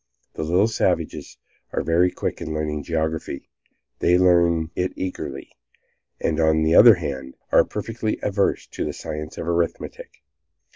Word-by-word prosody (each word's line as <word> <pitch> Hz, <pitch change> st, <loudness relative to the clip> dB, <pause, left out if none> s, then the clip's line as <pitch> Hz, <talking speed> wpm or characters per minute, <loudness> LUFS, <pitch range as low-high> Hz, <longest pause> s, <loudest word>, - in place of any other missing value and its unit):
The -, -, -5 dB
little 90 Hz, +7 st, +3 dB
savages 115 Hz, -, -1 dB, 0.4 s
are -, -, -1 dB
very 85 Hz, +2 st, +3 dB
quick -, -, -4 dB
in 80 Hz, -, -4 dB
learning 75 Hz, -1 st, -2 dB
geography. 80 Hz, -2 st, -3 dB, 0.5 s
They 90 Hz, +1 st, +4 dB
learn 85 Hz, -3 st, +3 dB
it 90 Hz, +1 st, -1 dB
eagerly, 70 Hz, -7 st, -5 dB, 0.7 s
and 80 Hz, -1 st, -1 dB
on 80 Hz, 0 st, +3 dB
the 80 Hz, +1 st, +2 dB
other 115 Hz, +2 st, +9 dB
hand, 65 Hz, -6 st, -5 dB, 0.2 s
are -, -, +6 dB
perfectly 110 Hz, +1 st, -3 dB
averse 100 Hz, -1 st, 0 dB
to -, -, -5 dB
the -, -, -3 dB
science 75 Hz, 0 st, -6 dB
of 80 Hz, -, -5 dB
arithmetic. 85 Hz, -4 st, -3 dB
85 Hz, 145 wpm, -23 LUFS, 80-90 Hz, 0.7 s, other